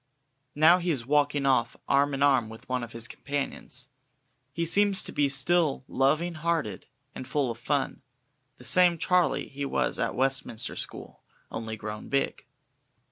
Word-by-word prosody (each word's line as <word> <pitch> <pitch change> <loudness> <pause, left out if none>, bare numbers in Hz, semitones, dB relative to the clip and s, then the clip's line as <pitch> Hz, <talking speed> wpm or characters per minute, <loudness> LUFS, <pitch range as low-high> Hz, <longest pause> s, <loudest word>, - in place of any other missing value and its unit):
Now 160 +4 +6
he 180 0 -2
is 135 -8 0
walking 145 0 +2
off 125 -3 +2
arm 140 0 +3
in 135 - 0
arm 130 -6 +3
with 110 0 -12
one 125 -1 -1
of 120 - -7
his 115 0 -4
companions. 140 0 -4 0.6
He 170 - -2
seems 200 +3 +2
to - - -7
be 145 -1 +2
still 140 +1 +2
loving 155 +6 +1
hearted 155 - -2 0.3
and 130 - -7
full 135 -2 0
of 115 - -8
fun, - - -1 0.6
the - - -14
same 180 -2 +4
Charlie 175 -5 +2
he 140 0 -5
was 140 - -1
at - - -1
Westminster 135 -4 -1
School - - -7 0.3
only 110 -1 -5
grown 105 0 -7
big. 140 0 -1
140 Hz, 160 wpm, -28 LUFS, 125-165 Hz, 0.6 s, Now